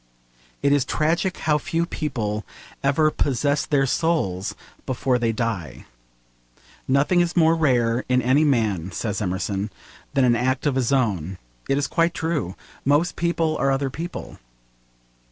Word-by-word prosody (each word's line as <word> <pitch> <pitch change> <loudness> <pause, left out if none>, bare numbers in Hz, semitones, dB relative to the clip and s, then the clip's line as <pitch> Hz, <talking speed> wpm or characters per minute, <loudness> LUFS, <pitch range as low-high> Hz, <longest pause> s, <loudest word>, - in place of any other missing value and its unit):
It 140 - +4
is 145 -2 +3
tragic 165 +6 0
how 150 -1 +1
few 165 +4 -1
people 110 -11 -3 0.4
ever 155 +3 +3
'possess 145 +2 0
their 140 -2 +2
souls' 130 - 0 0.3
before 130 0 +1
they 115 -1 +1
die. 110 - -3 1.0
'Nothing 145 +7 +3
is 175 +1 -1
more 165 -1 +5
rare 125 -7 +2
in 125 0 +4
any 130 +4 +3
man,' 110 - +1
says 105 +3 -3
Emerson, 95 +2 -2 0.5
'than 135 -2 +4
an 120 -1 +4
act 130 +3 0
of 145 - +2
his 130 -1 0
own.' 95 - 0 0.3
It 135 - +2
is 145 - +1
quite 170 0 +1
true. 155 - -2 0.3
Most 145 +5 +2
people 165 -2 0
are 135 - +1
other 135 0 0
people. 170 +6 -7
135 Hz, 145 wpm, -23 LUFS, 115-155 Hz, 1.0 s, more